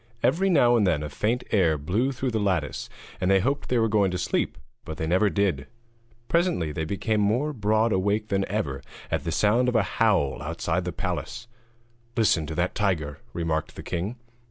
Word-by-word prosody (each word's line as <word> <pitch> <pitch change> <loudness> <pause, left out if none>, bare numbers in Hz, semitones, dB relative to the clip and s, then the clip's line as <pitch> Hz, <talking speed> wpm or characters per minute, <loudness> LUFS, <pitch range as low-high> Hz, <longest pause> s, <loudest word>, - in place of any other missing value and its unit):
Every 190 +4 +3
now 120 -9 +5
and 105 -4 +3
then 80 -4 +1
a 75 - -4
faint 115 - -1
air 85 -7 +3
blew 100 - 0
through 130 -1 -2
the 110 - 0
lattice, 90 -9 -1 0.3
and 90 - +1
they 95 0 +5
hoped 140 +9 -1
they 125 - +2
were 115 -1 +3
going 105 -3 +2
to 90 - -2
sleep, 90 - -1 0.3
but 80 - -7
they 80 - -2
never 95 +6 +3
did. 95 -10 0 0.6
Presently 170 - +1
they 80 +2 -3
became 105 +4 0
more 120 +9 +1
broad 110 -1 +2
awake 105 +3 0
than 95 -1 +1
ever 80 -10 -2 0.3
at - - -1
the - - -1
sound 115 +4 +3
of 125 - -2
a 115 - +4 0.2
howl 95 -13 +2
outside 85 +3 -2
the 90 - -2
palace. 95 +6 -4 0.7
'Listen 85 -8 +3
to 80 - -5
that 90 +2 0
tiger!' 80 -8 -1
remarked 80 -2 -2
the - - -8
king. 95 +6 -3
100 Hz, 195 wpm, -26 LUFS, 85-115 Hz, 0.7 s, now